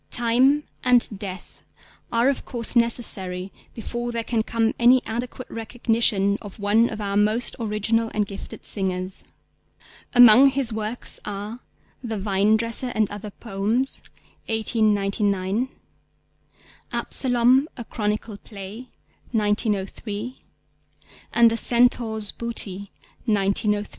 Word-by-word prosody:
Time 255 Hz, +5 st, +2 dB, 0.2 s
and 240 Hz, -5 st, +2 dB
Death 190 Hz, -3 st, -8 dB, 0.5 s
are 235 Hz, +2 st, +2 dB
of 275 Hz, -, 0 dB
course 235 Hz, 0 st, -4 dB
necessary 195 Hz, -6 st, +1 dB, 0.2 s
before 240 Hz, +1 st, -4 dB
there 230 Hz, -1 st, -2 dB
can 225 Hz, -1 st, 0 dB
come 225 Hz, 0 st, 0 dB
any 245 Hz, +2 st, +5 dB
adequate 245 Hz, +2 st, -5 dB
recognition 225 Hz, -3 st, 0 dB
of 205 Hz, -2 st, -10 dB
one 215 Hz, +3 st, +2 dB
of 220 Hz, -, -6 dB
our 200 Hz, -1 st, -2 dB
most 215 Hz, +4 st, +1 dB
original 225 Hz, +1 st, 0 dB
and 210 Hz, -1 st, 0 dB
gifted 200 Hz, 0 st, -10 dB
singers. 185 Hz, -1 st, -2 dB, 0.9 s
Among 245 Hz, +2 st, +8 dB
his 265 Hz, -4 st, -1 dB
works 220 Hz, +2 st, -4 dB
are 205 Hz, +3 st, -6 dB, 0.4 s
The 225 Hz, -3 st, -3 dB
Vinedresser 215 Hz, +5 st, +1 dB
and 215 Hz, -2 st, +1 dB
other 205 Hz, 0 st, -7 dB
Poems 225 Hz, +5 st, -2 dB, 0.5 s
(1899), 210 Hz, -1 st, 0 dB, 1.2 s
Absalom, 255 Hz, +2 st, +3 dB
A 240 Hz, -, -5 dB
Chronicle 210 Hz, -1 st, -3 dB
Play 210 Hz, +5 st, -10 dB, 0.4 s
(1903), 210 Hz, +1 st, -2 dB, 0.9 s
and 235 Hz, -1 st, +5 dB
The 230 Hz, -, -1 dB
Centaur's 235 Hz, -3 st, +3 dB
Booty 200 Hz, -4 st, -5 dB, 0.4 s
(1903). 205 Hz, 0 st, +1 dB
220 Hz, 110 wpm, -23 LUFS, 205-240 Hz, 1.2 s, Among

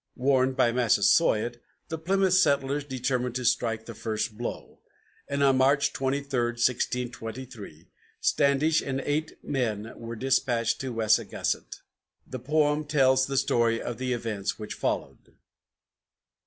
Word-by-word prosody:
Warned 130 Hz, 0 st, +2 dB
by 120 Hz, -3 st, +4 dB
Massasoit, 120 Hz, 0 st, +2 dB, 0.3 s
the 160 Hz, -, -3 dB
Plymouth 190 Hz, +2 st, +1 dB
settlers 140 Hz, -5 st, +2 dB
determined 125 Hz, -2 st, -2 dB
to 125 Hz, -1 st, -3 dB
strike 115 Hz, -2 st, 0 dB
the 115 Hz, -, -8 dB
first 110 Hz, 0 st, -3 dB
blow, 120 Hz, +2 st, -6 dB, 0.5 s
and 140 Hz, 0 st, -1 dB
on 135 Hz, -1 st, +4 dB
March 140 Hz, +2 st, +3 dB
23, 135 Hz, +1 st, -1 dB, 0.3 s
1623, 120 Hz, -6 st, -3 dB, 0.3 s
Standish 145 Hz, +3 st, +2 dB
and 135 Hz, -1 st, -3 dB
eight 150 Hz, +3 st, -2 dB
men 115 Hz, -4 st, -2 dB
were 115 Hz, 0 st, -7 dB
dispatched 125 Hz, -2 st, 0 dB
to 130 Hz, -1 st, -4 dB
Wessagusset. 110 Hz, -2 st, -1 dB, 0.4 s
The 130 Hz, -, -7 dB
poem 150 Hz, +3 st, +1 dB
tells 130 Hz, -3 st, +3 dB
the 135 Hz, 0 st, -2 dB
story 120 Hz, -4 st, +2 dB
of 120 Hz, -, -5 dB
the 130 Hz, -1 st, -2 dB
events 110 Hz, -4 st, -3 dB
which 105 Hz, -1 st, -6 dB
followed. -, -, -4 dB
130 Hz, 130 wpm, -27 LUFS, 115-140 Hz, 0.5 s, by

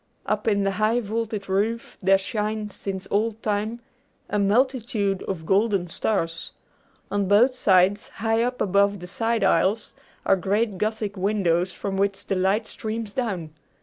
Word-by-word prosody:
Up 215 Hz, 0 st, -1 dB
in 200 Hz, -2 st, +2 dB
the 195 Hz, -, +1 dB
high 220 Hz, +3 st, +3 dB
vaulted 220 Hz, -2 st, -3 dB
roof 210 Hz, +5 st, -1 dB
there 195 Hz, 0 st, +5 dB
shine, 210 Hz, +1 st, -3 dB
since 190 Hz, -1 st, -5 dB
old 220 Hz, +2 st, 0 dB
time, 215 Hz, +3 st, -1 dB, 0.5 s
a 210 Hz, -, +1 dB
multitude 215 Hz, -2 st, +1 dB
of 170 Hz, -5 st, -4 dB
golden 195 Hz, -1 st, +2 dB
stars. 165 Hz, -3 st, -2 dB, 0.6 s
On 200 Hz, -1 st, 0 dB
both 220 Hz, +7 st, +5 dB
sides, 195 Hz, -3 st, +3 dB
high 225 Hz, +1 st, 0 dB
up 250 Hz, +1 st, -1 dB
above 200 Hz, +1 st, +2 dB
the 180 Hz, -, -8 dB
side 225 Hz, +5 st, -1 dB
aisles, 210 Hz, +3 st, +2 dB, 0.3 s
are -, -, +5 dB
great 200 Hz, +1 st, 0 dB
gothic 215 Hz, -1 st, -2 dB
windows 185 Hz, -3 st, +1 dB
from 195 Hz, 0 st, -4 dB
which 200 Hz, 0 st, 0 dB
the 195 Hz, -, -1 dB
light 195 Hz, +4 st, +1 dB
streams 220 Hz, -1 st, -5 dB
down. 190 Hz, -11 st, -3 dB
205 Hz, 150 wpm, -24 LUFS, 195-220 Hz, 0.6 s, there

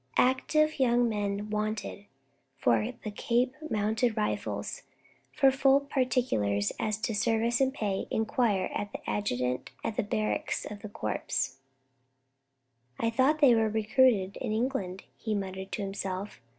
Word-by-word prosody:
"Active 305 Hz, +4 st, +3 dB
young 245 Hz, -2 st, +4 dB
men 205 Hz, -1 st, -2 dB
wanted 215 Hz, -1 st, -3 dB, 0.5 s
for 115 Hz, -5 st, +2 dB
the 215 Hz, -, -4 dB
Cape 240 Hz, +4 st, +1 dB, 0.2 s
Mounted 220 Hz, +2 st, +1 dB
Rifles. 210 Hz, -, -2 dB, 0.5 s
For 270 Hz, -2 st, +4 dB
full 270 Hz, +1 st, +4 dB
particulars 250 Hz, -, 0 dB
as 215 Hz, -1 st, 0 dB
to 225 Hz, -, -1 dB
service 230 Hz, +3 st, +1 dB
and 265 Hz, 0 st, +3 dB
pay, 205 Hz, -7 st, -2 dB
inquire 220 Hz, -3 st, +1 dB
of 205 Hz, 0 st, -3 dB
the -, -, -8 dB
Adjutant 125 Hz, -10 st, -1 dB
at 220 Hz, -, -3 dB
the -, -, +3 dB
Barracks 215 Hz, 0 st, -1 dB
of 205 Hz, -1 st, -7 dB
the 215 Hz, -, -7 dB
Corps." 120 Hz, -, -2 dB, 1.4 s
"I 230 Hz, 0 st, +1 dB
thought 270 Hz, +6 st, +2 dB
they 270 Hz, -4 st, +8 dB
were 225 Hz, -1 st, +3 dB
recruited 220 Hz, -2 st, +3 dB
in 240 Hz, -, -3 dB
England," 215 Hz, -6 st, -2 dB, 0.2 s
he 220 Hz, -2 st, -2 dB
muttered 190 Hz, -1 st, -4 dB
to 205 Hz, -, -2 dB
himself. 195 Hz, -5 st, -4 dB
215 Hz, 140 wpm, -29 LUFS, 200-250 Hz, 1.4 s, they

